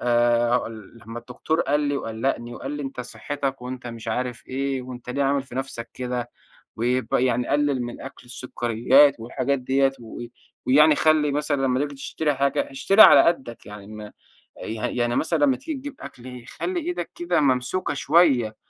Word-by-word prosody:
آآ 120 0 +2
هاقول 115 -2 -4
لمّا 115 +1 -6
الدكتور 125 +7 -2
قال 145 +1 +1
لي، 145 -1 0
وقلّقني، 120 0 -3
وقال 135 - -6
لي: 145 0 -4
"أنت 135 -2 -5
صحّتك، 135 +1 -5
وأنت 125 -1 -7
مش 115 -1 -7
عارف 125 +1 -3
إيه، 135 0 -2
وأنت 125 -1 -8
ليه 140 +2 -1
عامل 140 0 +1
في 130 -2 -13
نفسك 120 -3 -5
كده؟ 125 -1 -4 0.5
ويبقى 125 +2 0
يعني 125 -1 0
قلل 145 -2 +1
من 120 0 -6
أكل 135 -2 -10
السُكريّات 125 +3 +3
والحاجات 130 +4 -2
ديّة، 135 +1 +2
و 115 +1 -9 0.4
ويعني 150 +3 +6
خلّي 155 -2 +3
مثلًا 145 -1 -1
لمّا 130 0 +1
تييجي 145 -1 -3
تشتري 150 +2 -2
حاجة، 140 - 0
اشتري 220 -6 +4
على - - +10
قدّك 130 -9 -1
يعني 105 -1 -10
م 105 -1 -9 0.5
يعني 110 +2 -4
يعني 120 0 0
مثلًا 165 0 +1
لمّا 130 -2 +2
تييجي 305 -3 -6
تجيب 285 +1 -8
أكل، 125 -1 -10
خلّي 365 -1 -4
إيدك 350 +2 -4
كده 345 - 0
ممسوكة 130 +7 0
شوية." 140 -8 +3
130 Hz, 175 wpm, -24 LUFS, 120-145 Hz, 0.5 s, على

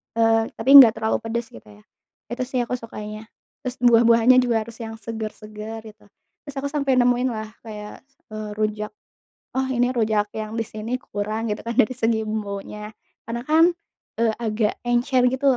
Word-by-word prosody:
eee, 225 0 +3
tapi - - -3
nggak 235 -5 +9
terlalu 220 - 0
pedes 230 +1 -3
gitu 110 - -14
ya, 105 0 -17 0.5
itu 250 +1 -2
sih 255 -1 -2
aku 240 - -3
sukanya. 215 -1 -8 0.4
Terus 255 -1 -4
buah-buahannya 235 +1 +6
juga 230 -3 +1
harus 230 +1 -12
yang 225 -1 -6
seger-seger 220 0 -7
gitu, 210 - -27 0.4
terus 285 - -8
aku 280 +1 -3
sampai 280 -3 +1
nemuin 245 0 +3
lah 215 0 -5 0.2
kayak, 210 -1 -8 0.3
eee, 215 0 -5
rujak, 215 0 -2 0.7
"Oh 265 - +1
ini 245 0 +2
rujak 215 -4 0
yang 215 0 -5
di 225 - -1
sini 215 +2 -7
kurang," 215 +2 -3
gitu 210 - -3
kan, 235 - -2
dari 255 - -1
segi 225 -2 +1
bumbunya. 210 0 -5 0.3
Karena 235 +1 -4
kan, 325 +3 +5 0.5
eee, 225 -1 +3
agak 215 -2 -1
encer 245 +1 +2
gitu 265 +2 -2
225 Hz, 170 wpm, -23 LUFS, 215-240 Hz, 0.7 s, nggak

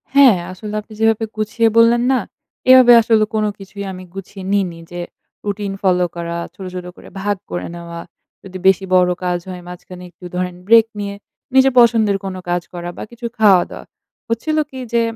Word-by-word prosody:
হ্যাঁ, 265 -9 +7
আসলে 210 +3 -8
আপনি 215 +1 -16
যেভাবে 225 0 +2
গুছিয়ে 220 +2 +1
বললেন 230 +1 +5
না? 260 - +3 0.5
এভাবে 255 -2 +9
আসলে 220 -1 +3
কোন 215 - +1
কিছুই 200 +1 -8
আমি 185 0 -9
গুছিয়ে 195 0 -9
নিইনি। 185 -4 0
যে 175 0 -5 0.4
রুটিন 205 -1 -3
ফলো 180 -2 +2
করা, 170 0 -4 0.2
ছোট, 190 - -9
ছোট 180 -1 -5
করে - - -14
ভাগ 205 0 -1
করে 175 - -3
নেওয়া। 170 0 -8 0.4
যদি 190 -1 -8
বেশি 190 0 +4
বড় 180 -1 +4
কাজ 180 -1 0
হয় 180 -1 -7
মাঝখানে 180 0 -10
একটু 180 +2 -15
ধরেন 180 0 -2
ব্রেক 230 0 +7
নিয়ে 200 0 -4 0.4
নিজের 265 -1 +5
পছন্দের 225 -4 +4
কোন 190 -1 -4
কাজ 175 0 0
করা 175 0 -5
বা - - -5
কিছু 235 0 -9
খাওয়া-দাওয়া। 195 -5 +3 0.4
হচ্ছিল 305 +8 -1
কি? 265 - -9
যে 235 - +3
200 Hz, 180 wpm, -18 LUFS, 180-225 Hz, 0.5 s, এভাবে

